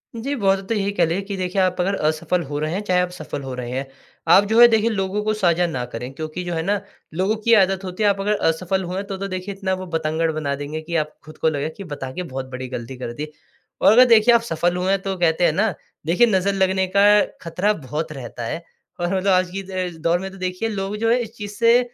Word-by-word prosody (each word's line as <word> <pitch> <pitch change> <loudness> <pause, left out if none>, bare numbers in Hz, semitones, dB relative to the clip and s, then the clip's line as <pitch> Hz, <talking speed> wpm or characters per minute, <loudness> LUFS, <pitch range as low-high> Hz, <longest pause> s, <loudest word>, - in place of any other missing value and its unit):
जी, 250 +5 -3
बहुत 195 -5 +2
हद 195 - -10
तक 230 - +1
यही 200 -1 0
कह 170 - +6
लें 170 +4 -1
कि 200 0 -4
देखिए 185 +1 0
आप 185 -1 +1
अगर 195 +3 0
असफल 160 +3 0
हो 145 0 -4
रहे 155 +2 -2
हैं, 195 - -1
चाहे 185 -3 +2
आप 180 - -1
सफल 155 -4 -6
हो 135 -1 -5
रहे 125 -1 -5
हैं, 135 +2 -2 0.4
आप 190 +4 +7
जो 225 - +4
है 240 - +11
देखिए 225 -1 +2
लोगों 200 -1 -1
को 215 0 +1
साझा 180 -4 +2
न 130 -7 -3
करें 125 +3 -5
क्योंकि 155 +5 -5
जो 175 -1 -3
है 160 - -1
ना, 200 +3 +1 0.3
लोगों 190 +6 +1
की 230 - +4
आदत 195 -2 +4
होती 185 +3 -3
है, 205 - +5
आप 200 -1 0
अगर 210 +1 +1
असफल 185 +4 0
हुए 180 +1 -5
हैं 200 - -3
तो 195 -1 -4
तो 195 +1 -4
देखिए 185 +1 -5
इतना 190 -1 -2
वो - - -5
बतंगड़ 160 0 0
बना 155 -3 -2
देंगे 150 +2 -4
कि 170 +2 -5
आप 150 - -18
खुद 155 - -12
को 160 - +2
लगे 145 0 -2
कि 200 - -6
बता 135 -2 -5
के 180 - -4
बहुत 130 0 -4
बड़ी 130 0 -5
गलती 125 +1 -6
कर 120 -2 -5
दी। 150 +5 -5 0.5
और - - +7
अगर 250 +4 +8
देखिए 235 0 +6
आप 235 - +4
सफल 175 -5 0
हुए 185 +1 0
हैं, 195 -1 +1
तो 195 0 -3
कहते 170 -1 +2
हैं 165 - +4
ना, 210 +3 +1 0.3
देखिए 180 +9 +4
नज़र 195 -2 +2
लगने 190 -1 +1
का 200 - +6 0.4
खतरा 180 +5 0
बहुत 155 +4 -3
रहता 120 -3 -7
है 165 +8 -4 0.4
और 175 +2 0
मतलब 190 +1 +1
आज 185 -1 +3
की 195 +1 -4
द 185 -1 -3
दौर 170 +2 +2
में 190 +1 -5
तो 195 - -12
देखिए 185 +4 -2
लोग 200 -1 -3
जो 225 +1 +1
हैं 245 - +3
इस 225 -2 -5
चीज़ 205 -3 -6
से 235 +2 +5
185 Hz, 270 wpm, -22 LUFS, 160-200 Hz, 0.5 s, है